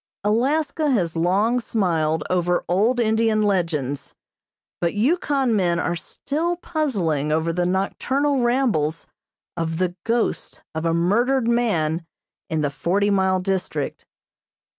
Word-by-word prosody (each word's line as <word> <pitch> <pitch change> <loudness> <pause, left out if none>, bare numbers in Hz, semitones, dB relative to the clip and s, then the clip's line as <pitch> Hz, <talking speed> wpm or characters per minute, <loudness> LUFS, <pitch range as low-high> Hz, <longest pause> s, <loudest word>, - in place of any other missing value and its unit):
Alaska 290 +8 +1
has 180 - +1
long 200 +9 +2
smiled 160 -9 0
over 175 -1 0
old 215 +8 +2
Indian 220 -1 +2
legends, 165 -9 -1 0.6
but 170 +1 -1
Yukon 270 0 +1
men 175 -4 +2
are 170 - -1
still 320 - -3
puzzling 195 - -1
over 160 +2 +1
the 175 +1 0
nocturnal 265 +9 0
rambles 240 - +1 0.5
of 165 -1 -2
the 180 0 -1
ghost 230 0 -1
of 160 +1 -3
a 165 - +2
murdered 230 +9 +2
man 175 -9 +1 0.5
in 160 -1 0
the 145 -2 0
Forty 200 +7 0
Mile 190 -1 +2
District. 190 -1 -2
195 Hz, 120 wpm, -22 LUFS, 170-240 Hz, 0.6 s, long